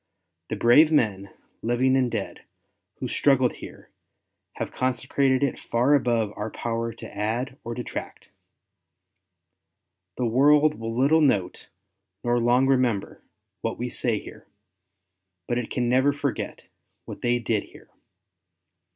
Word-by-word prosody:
The - - -2
brave 150 +7 +5
men, 100 -9 +1 0.3
living 125 +3 +2
and 130 -2 +2
dead, 110 -4 -5 0.5
who - - -5
struggled 130 -3 +2
here, - - -12 0.6
have - - -5
consecrated 130 +1 0
it 140 - -1
far 125 +5 +1
above 120 -6 +1
our 105 +1 -4
power 115 +1 -3
to 115 - -11
add 120 +6 -3
or 115 0 -5
detract. 125 - -7 1.9
The 125 - 0
world 145 +5 +4
will 115 +1 -4
little 145 +5 +4
note, 100 -11 0 0.6
nor 120 0 +1
long 120 +3 +3
remember, 125 -6 0 0.4
what - - -3
we - - -3
say - - -1
here; - - -11 1.0
but 120 - 0
it 120 - -5
can 125 -2 -1
never 130 +3 +3
forget 145 -2 -4 0.4
what - - -9
they 120 0 +2
did 110 -3 -1
here. - - -18
125 Hz, 130 wpm, -25 LUFS, 115-135 Hz, 1.9 s, brave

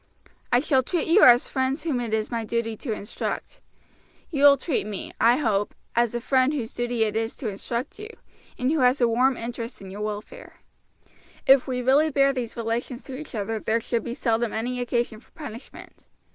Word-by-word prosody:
"I 245 - +5
shall 275 -3 +3
treat 325 +6 -2
you 340 +6 +5
as 245 0 +7
friends 265 +3 -1
whom 300 -7 -1
it 235 -2 -3
is 220 +1 -1
my 230 -1 -2
duty 225 0 -2
to 235 +2 -5
instruct. 215 - -5 0.7
You 285 -3 +3
will 280 -1 +8
treat 265 - -2
me, 205 -2 -5
I 235 +2 +6
hope, 210 -7 0 0.2
as 235 0 +2
a - - 0
friend 260 +2 +2
whose 235 -5 -4
duty 240 -1 0
it 215 -1 -1
is 225 +1 -2
to 245 -7 -3
instruct 235 - -5
you, 425 +1 -7 0.5
and 255 +2 0
who 320 - +1
has 255 +1 +4
a 240 - +4
warm 250 +3 +2
interest 235 +1 -6
in 190 -1 -10
your 205 +2 -7
welfare; 215 - -6 0.9
if 270 -1 +6
we 250 -1 -2
really 280 +5 +4
bear 275 -1 +3
these 240 -3 -4
relations 235 +2 -3
to 265 - -8
each 290 -2 -8
other 220 +1 -2
there 225 +2 0
should 230 -1 -2
be 235 - -5
seldom 230 -2 0
any 245 +3 -2
occasion 240 -2 -1
for - - -24
punishment. 275 -6 -10
240 Hz, 200 wpm, -25 LUFS, 225-270 Hz, 0.9 s, will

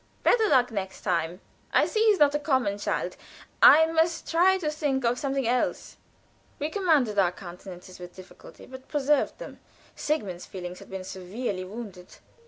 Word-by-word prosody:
"Better 445 -3 +4
luck 250 -3 +3
next 190 -3 -5
time. 175 -1 -2 0.3
I - - +4
see 435 -1 0
he's 420 -2 +5
not 290 -3 +4
a 295 - 0
common 260 -9 0
child. - - -2 0.5
I 320 +2 +8
must 325 +1 0
try 365 +3 +4
to 310 -5 -2
think 285 -4 -1
of 240 +1 +1
something 270 -3 -1
else." 245 +1 -1 0.6
We 300 +2 -3
commanded 305 - +2
our 180 -3 +3
countenances 180 0 -11
with 180 0 -10
difficulty, 185 0 -14
but 260 0 -12
preserved 295 0 +1
them. - - -10 0.4
Sigmund's 200 - -3
feelings 180 -1 -7
had - - -14
been 190 -1 -6
severely 190 +2 -5
wounded. 195 -3 -10
245 Hz, 165 wpm, -26 LUFS, 185-300 Hz, 0.6 s, I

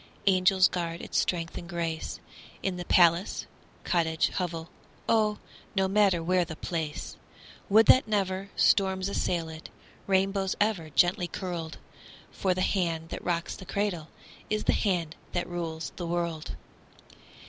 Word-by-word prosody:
Angels 185 -1 +5
guard 170 -1 -3
its - - -1
strength 170 -2 -1
and 170 - -10
grace, 165 -2 -3 0.4
In 190 -2 -1
the 175 - -5
palace, 170 +2 +3 0.4
cottage, 160 -2 +1
hovel, 165 -3 -4 0.4
Oh, 215 -2 +3 0.4
no 190 -1 +3
matter 195 -4 +3
where 180 +1 +2
the 160 -1 -7
place; 160 -2 -4 0.5
Would 220 +3 +6
that 255 +1 +6
never 195 -2 -1
storms 190 -1 +3
assailed 170 -4 -1
it, 160 0 -10 0.4
Rainbows 195 0 +1
ever 205 -7 +1
gently 175 +5 +3
curled; 170 -3 -5 0.5
For 185 -2 0
the 185 - -1
hand 165 -5 0
that - - -6
rocks 170 -1 -1
the - - -10
cradle 190 -5 -2 0.4
Is 215 0 0
the - - +3
hand 175 -6 0 0.2
that 175 - -1
rules 165 -2 -4
the 175 - -4
world. 170 -2 -2
180 Hz, 140 wpm, -28 LUFS, 165-195 Hz, 0.5 s, Would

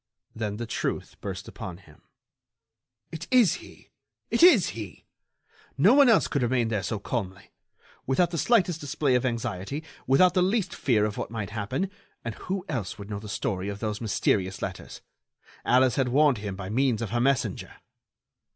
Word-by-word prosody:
Then 105 -2 -3
the 120 - -4
truth - - -3
burst - - -6
upon 90 -2 -7
him: 80 -6 -19 1.1
"It 165 +1 -7
is 245 -7 +4
he! - - -16 0.4
It - - +1
is 295 - +7
he! 105 -7 -8 0.7
No 195 - +6
one 280 -2 +7
else 225 - +4
could 140 - -1
remain 120 -1 +1
there 105 -3 -1
so 110 +4 -2
calmly, 100 -3 -5 0.6
without 170 +7 +2
the 165 - -2
slightest 180 -8 +2
display 145 -1 0
of 125 +1 +2
anxiety, 115 +4 -3 0.2
without 175 +8 +5
the 180 - +3
least 195 0 +1
fear 110 -6 +2
of 105 -1 -3
what - - -4
might 110 -3 -5
happen. 110 - -2 0.3
And 115 - -3
who 190 - -4
else 115 - -3
would 100 +1 -9
know 100 - -3
the 105 0 -9
story 100 -4 -2
of 100 - -5
those 105 -1 -3
mysterious 100 -3 0
letters? - - -6 0.6
Alice 130 0 +3
had 135 -2 +2
warned 140 -1 +3
him 100 -2 -5
by 95 -1 -6
means 120 -1 +1
of 110 - -5
her 120 0 +1
messenger." 135 0 0
120 Hz, 175 wpm, -27 LUFS, 105-155 Hz, 1.1 s, is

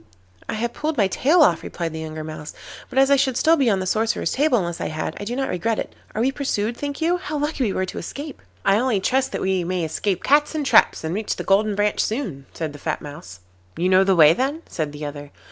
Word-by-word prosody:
'I - - -1
have 235 +2 -2
pulled 310 -1 -3
my 205 - +4
tail 295 - +3
off,' 170 - +3
replied 165 -2 -4
the 160 - -5
younger 155 0 -6
Mouse, 155 -1 -8 0.3
'but 265 - -7
as 270 +1 +5
I 280 - +6
should 265 -2 +1
still 325 +1 +4
be 275 -6 +2
on 195 -3 +2
the 185 - -3
sorcerer's 220 +4 0
table 280 -2 +2
unless 175 -4 -3
I - - -1
had, 155 +1 -4
I 205 - -5
do 240 +4 -3
not 270 0 -1
regret 215 +5 -1
it. - - -4 0.2
Are 215 - 0
we 265 - +2
pursued, 235 -5 -2
think 285 +4 -5
you? 345 +2 +2
How 310 -4 -4
lucky 295 -2 -1
we 200 - -1
were 185 - 0
to - - -6
escape!' 285 0 -7 0.2
'I 195 +1 +4
only 240 -5 +1
trust 260 +7 +1
that - - -3
we 190 -1 +1
may 180 0 -2
escape 185 +4 -2
cats 295 +3 +3
and 300 -2 -1
traps, - - +4
and 160 +1 -2
reach 210 +2 -2
the - - -5
Golden 205 +2 +2
Branch 205 0 0
soon,' 195 - -2
said 155 -3 -5
the 145 - -11
fat 155 +1 -3
Mouse. 95 -12 -10 0.4
'You 180 +2 +1
know 190 +1 +6
the 195 -1 +3
way 155 -2 +7
then?' 275 - -2
said 155 -3 -3
the 150 +1 -7
other. 145 0 -7
205 Hz, 260 wpm, -22 LUFS, 165-270 Hz, 0.4 s, way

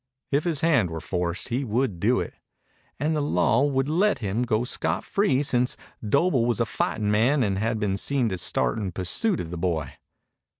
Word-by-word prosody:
If 145 +3 +1
his 160 -4 0
hand 140 - +3
were 80 0 -5
forced 90 +1 -3
he 125 +4 -1
would 115 -5 -1
do 120 +7 +2
it. - - -4 0.7
And 155 +3 0
the 150 - 0
law 115 -1 +2
would 135 -2 +1
let 190 +7 +2
him 105 +1 -2
go 115 -2 +1
scot 125 - -2
free, 170 -9 +1
since 125 -2 +1 0.3
Doble 130 - +2
was 120 - 0
a 115 - +2
fighting 105 -1 -1
man 125 +6 +3
and 100 -3 0
had 110 +1 0
been 100 -2 0
seen 130 +3 0
to 95 -3 -3
start 65 - 0
in 95 -4 -3
pursuit 170 - 0
of 80 - -5
the 90 - -5
boy. 80 -6 -1
115 Hz, 200 wpm, -25 LUFS, 95-140 Hz, 0.7 s, hand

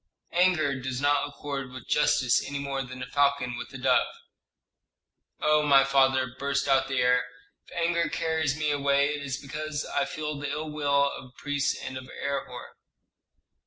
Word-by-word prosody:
Anger 170 -6 +2
does 130 -1 -3
not 145 0 +2
accord 140 -2 -5
with 130 -1 -10
justice 130 -4 +3
any 140 - -4
more 140 -1 -2
than 130 0 -7
a - - -4
falcon 140 -3 +1
with - - -7
a - - -7
dove." - - +3 1.3
"Oh, 150 0 +3
my 140 -2 +6
father," 135 -2 +2
burst 140 0 0
out 135 -1 +3
the 135 0 -2
heir, 125 0 +3 0.4
"if - - -13
anger 170 -1 +1
carries 160 -3 0
me 150 -1 0
away, 140 0 +2
it 150 - -5
is 135 -3 -3
because 150 +2 -4
I - - 0
feel 150 -1 -4
the 145 -1 -3
ill 150 +2 -4
will 140 -1 +2
of - - -9
the 125 - -17
priests 145 -1 -1
and 130 - -5
of 130 - -12
Herhor." 135 -3 -5
140 Hz, 175 wpm, -27 LUFS, 135-150 Hz, 1.3 s, my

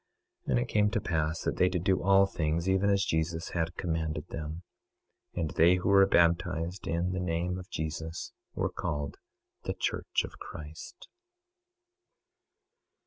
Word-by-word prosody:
26:20 - - -5
And 60 -2 +3
it - - -1
came 105 -1 +3
to 110 +1 0
pass 80 -3 -1
that - - -1
they 90 - +4
did 90 -2 -2
do 95 -1 +2
all 95 +1 +6
things 85 -2 -1
even 95 +1 +3
as 100 0 +3
Jesus 80 0 -1
had 85 0 -2
commanded 80 -2 -2
them. 80 +2 -5 0.7
26:21 - - 0
And 80 - -1
they 85 +3 +5
who 90 - -1
were 100 -1 +7
baptized 85 +1 +2
in 85 +2 0
the 90 - -2
name 90 +1 -1
of 90 - -10
Jesus 80 +1 -4 0.2
were - - 0
called 70 -1 -3 0.5
the - - -2
church - - -1
of - - -9
Christ. 75 +1 -9
85 Hz, 160 wpm, -30 LUFS, 80-90 Hz, 0.7 s, were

